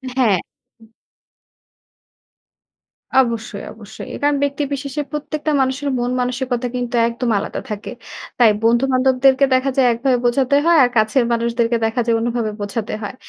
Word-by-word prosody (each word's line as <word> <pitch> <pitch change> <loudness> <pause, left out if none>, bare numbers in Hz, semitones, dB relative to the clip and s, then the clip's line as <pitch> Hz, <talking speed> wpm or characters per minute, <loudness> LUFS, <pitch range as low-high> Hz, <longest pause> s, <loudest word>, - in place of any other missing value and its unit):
হ্যাঁ। 225 -8 +3 0.4
হুম। 225 - -19 2.3
অবশ্যই, 230 -5 0
অবশ্যই। 220 -1 -10
কারণ 290 0 +2
ব্যক্তিবিশেষে 280 0 -3
প্রত্যেকটা 300 +1 -3
মানুষের 265 +2 -1
মন 245 +1 -1
মানসিকতা 250 0 -2
কিন্তু 245 0 -3
একদম 235 +1 -3
আলাদা - - -5
থাকে। 210 -1 -6 0.5
তাই 235 -3 +6
বন্ধু-বান্ধবদেরকে 260 +3 +3
দেখা 260 +1 +1
যায় 260 -2 +4
একভাবে 250 +2 +1
বোঝাতে 255 +3 +2
হয়। 340 0 +5
আর 245 - +3
কাছের 220 +4 +3
মানুষদেরকে 235 0 0
দেখা 225 +2 0
যায় 230 -1 +2
অন্যভাবে 230 -1 -2
বোঝাতে 205 +2 -4
হয়। 205 +4 -6
245 Hz, 130 wpm, -19 LUFS, 230-270 Hz, 2.3 s, তাই